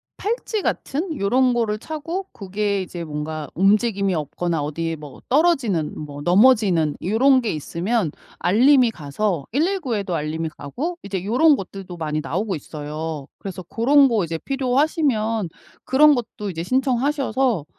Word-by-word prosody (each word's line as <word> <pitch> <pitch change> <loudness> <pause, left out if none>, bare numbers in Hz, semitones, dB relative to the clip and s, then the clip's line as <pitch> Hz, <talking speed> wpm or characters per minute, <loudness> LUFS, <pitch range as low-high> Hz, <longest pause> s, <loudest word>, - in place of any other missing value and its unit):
팔찌 440 0 -2
같은 315 0 -2
요런 250 +5 +3
거를 220 -3 0
차고 325 - -5
고게 200 0 -2
이제 175 -1 -7
뭔가 150 0 -5
움직임이 200 0 +2
없거나 160 +1 -2
어디에 165 +2 -3
뭐 150 -2 -11
떨어지는 250 - +2
뭐 145 -1 -7
넘어지는 185 - +4
요런 255 +7 +4
게 225 - -1
있으면 170 +5 -1 0.3
알림이 245 +5 +4
가서 165 0 -2
119 310 - 0
에도 195 -4 -2
알림이 160 +1 -2
가고 290 - -4
이제 190 -2 -4
요런 275 +8 +4
것들도 190 -3 -8
많이 155 -1 -2
나오고 190 +5 -2
있어요. 150 0 -6
그래서 185 -2 -7
고런 275 - +4
거 225 -7 +1
이제 165 0 -3
필요하시면 255 - 0 0.3
그런 295 +3 +5
것도 225 -4 -4
이제 165 -1 -4
신청하셔서 260 - +1
210 Hz, 315 characters per minute, -22 LUFS, 165-260 Hz, 0.3 s, 그런